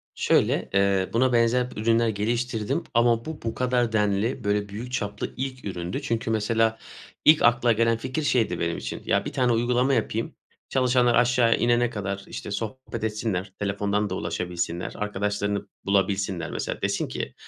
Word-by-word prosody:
Şöyle, - - +2
eee, 100 -1 +2
buna 125 +2 +3
benzer 120 +1 +3
ürünler 115 +1 +2
geliştirdim 110 +1 -1
ama 115 0 +3
bu 160 -1 -6
bu 115 - -3
kadar 125 -2 +1
denli, 105 +2 0
böyle 100 0 0
büyük 115 +5 -7
çaplı 105 -5 -3
ilk 130 -1 -4
üründü. 90 +5 -4
Çünkü 115 -4 -2
mesela 110 +1 +1 0.5
ilk 155 0 +7
akla 120 0 +4
gelen 115 0 +2
fikir 130 +6 -3
şeydi 115 -10 +1
benim 85 0 -1
için. - - -5
Ya, - - +1
bir - - -5
tane 125 -1 +2
uygulama 125 +3 +2
yapayım. 115 -1 -1 0.3
Çalışanlar 125 -2 +3
aşağıya 120 -1 +4
inene 120 0 +2
kadar 100 -3 -4
işte - - -7
sohbet 115 +4 -5
etsinler. 105 -3 -2
Telefondan 100 +1 0
da 95 - -3
ulaşabilsinler. 90 -1 -3
Arkadaşlarını 105 0 -2 0.2
bulabilsinler. 95 -4 0
Mesela - - -4
desin - - -1
ki, - - -5
115 Hz, 155 wpm, -25 LUFS, 100-120 Hz, 0.5 s, ilk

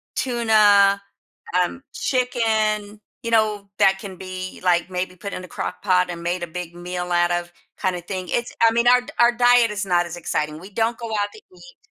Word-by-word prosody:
tuna, 215 -5 +4 0.6
um, 265 +9 -6
chicken, 220 -5 0 0.2
you 230 - -3
know, 215 -3 +1
that 195 0 +4
can 195 -2 -8
be, 185 0 -7
like, 175 0 +2
maybe 180 0 -3
put 200 +3 -7
in - - -4
the 185 - -10
crock-pot 180 -1 0
and 170 -1 -6
made 175 +1 -2
a 175 - -2
big 170 +1 -7
meal 180 0 -5
out 175 0 +3
of 175 0 -2 0.3
kinda 185 -3 -1
thing, 185 0 -5
it's 240 +1 -2
I 225 0 +6
mean, 235 +1 +1
our 250 0 +6
d - - -19
our 240 0 +6
diet 245 -1 +4
is 210 -1 -3
not 175 -2 +2
as 170 0 -7
exciting, 150 -2 -2
we 185 +5 -12
don't 225 +3 -1
go 235 - -6
out 205 -1 0
to - - -13 0.2
eat. - - -15
200 Hz, 200 wpm, -22 LUFS, 180-225 Hz, 0.6 s, I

